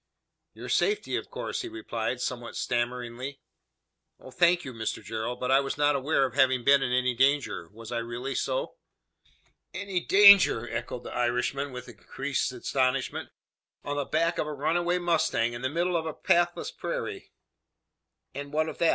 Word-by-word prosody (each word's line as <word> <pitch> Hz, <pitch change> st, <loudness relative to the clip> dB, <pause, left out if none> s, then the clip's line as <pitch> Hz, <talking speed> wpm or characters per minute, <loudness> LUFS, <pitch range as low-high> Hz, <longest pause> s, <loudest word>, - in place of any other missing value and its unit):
"Your -, -, -8 dB
safety 420 Hz, 0 st, +1 dB
of -, -, -4 dB
course," -, -, -4 dB
he 365 Hz, -, -5 dB
replied, 125 Hz, -, -4 dB
somewhat 120 Hz, -2 st, -4 dB
stammeringly. 125 Hz, +2 st, -3 dB, 0.8 s
"Oh, 130 Hz, -, -12 dB
thank 175 Hz, +3 st, +3 dB
you, 130 Hz, -, -6 dB
Mr 110 Hz, -1 st, -4 dB
Gerald; 115 Hz, +3 st, -4 dB
but 125 Hz, +1 st, -1 dB
I 135 Hz, -, +6 dB
was 135 Hz, 0 st, -3 dB
not 145 Hz, 0 st, +3 dB
aware 140 Hz, 0 st, +2 dB
of 130 Hz, -, -5 dB
having 130 Hz, -1 st, +3 dB
been 140 Hz, +1 st, +5 dB
in 125 Hz, -, -1 dB
any 125 Hz, 0 st, +2 dB
danger. 135 Hz, -, +1 dB
Was 115 Hz, +2 st, -11 dB
I 120 Hz, -, -1 dB
really 120 Hz, +3 st, -4 dB
so?" -, -, -2 dB, 1.0 s
"Any 195 Hz, -2 st, -2 dB
danger!" 195 Hz, -, +7 dB
echoed 120 Hz, +1 st, -5 dB
the -, -, -8 dB
Irishman, 125 Hz, +3 st, -1 dB
with 125 Hz, 0 st, -8 dB
increased 130 Hz, +3 st, -3 dB
astonishment. 130 Hz, +1 st, -1 dB, 0.5 s
"On 145 Hz, -, -3 dB
the 145 Hz, -1 st, -1 dB
back 165 Hz, +4 st, 0 dB
of -, -, -1 dB
a 150 Hz, -, -4 dB
runaway 175 Hz, +5 st, +1 dB
mustang 160 Hz, -9 st, +1 dB
in 120 Hz, -, -6 dB
the 130 Hz, -, -1 dB
middle 175 Hz, +4 st, 0 dB
of 160 Hz, -1 st, -1 dB
a 155 Hz, -, -5 dB
pathless 175 Hz, 0 st, +1 dB
prairie!" -, -, -5 dB, 1.0 s
"And 140 Hz, +1 st, -7 dB
what 155 Hz, +1 st, 0 dB
of -, -, -9 dB
that? 170 Hz, -, +4 dB
135 Hz, 170 wpm, -28 LUFS, 120-160 Hz, 1.0 s, danger